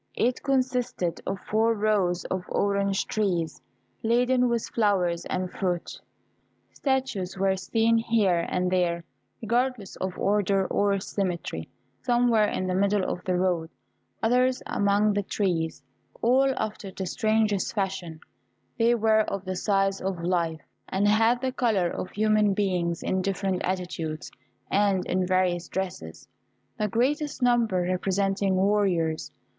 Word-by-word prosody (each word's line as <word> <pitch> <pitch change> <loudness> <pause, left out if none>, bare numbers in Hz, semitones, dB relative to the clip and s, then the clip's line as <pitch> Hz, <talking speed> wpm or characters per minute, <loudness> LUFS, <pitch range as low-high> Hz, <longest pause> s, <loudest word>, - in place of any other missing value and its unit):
It 245 +1 0
consisted 250 - -1
of 195 - -2
four 225 +2 +1
rows 205 -4 +1
of 185 -1 -3
orange 200 -1 +1
trees, 175 -7 -1 0.4
laden 245 +2 +2
with 235 -1 0
flowers 180 -6 +1
and 185 0 -2
fruit. 180 -3 -3 0.7
Statues 260 -10 -1
were 190 0 +2
seen 225 +4 +2
here 210 -7 +1
and 180 0 0
there, 175 -2 +1 0.4
regardless 235 -2 -1
of 185 -1 -4
order 200 -1 +2
or 200 +1 +1
symmetry 180 - -3 0.3
some 240 - +2
were 220 -2 +4
in 185 - -2
the 185 - -1
middle 200 +1 +2
of 180 - -4
the 185 -1 +1
road, 175 -3 0 0.5
others 250 +2 +2
among 205 +1 +2
the 205 - +1
trees 165 -8 -2 0.4
all 265 +3 +3
after 215 -2 -4
the 190 0 -5
strangest 215 +1 0
fashion; 190 -5 -3 0.6
they 235 +1 +4
were 220 -1 +3
of 200 -1 -4
the 185 0 -3
size 195 0 +1
of 185 -3 -3
life, 170 -3 0 0.3
and 195 +2 +1
had 225 +3 +3
the 260 -1 -1
colour 215 -9 +1
of 185 - -5
human 215 -1 +2
beings, 180 -4 0
in 190 - 0
different 190 -1 -1
attitudes, 175 -4 -3 0.4
and 195 -2 +2
in 185 0 0
various 180 -2 +1
dresses, 130 - -5 0.5
the 210 - +1
greatest 270 - 0
number 235 -7 +3
representing 195 +2 0
warriors. 185 -5 +1
195 Hz, 135 wpm, -26 LUFS, 180-220 Hz, 0.7 s, were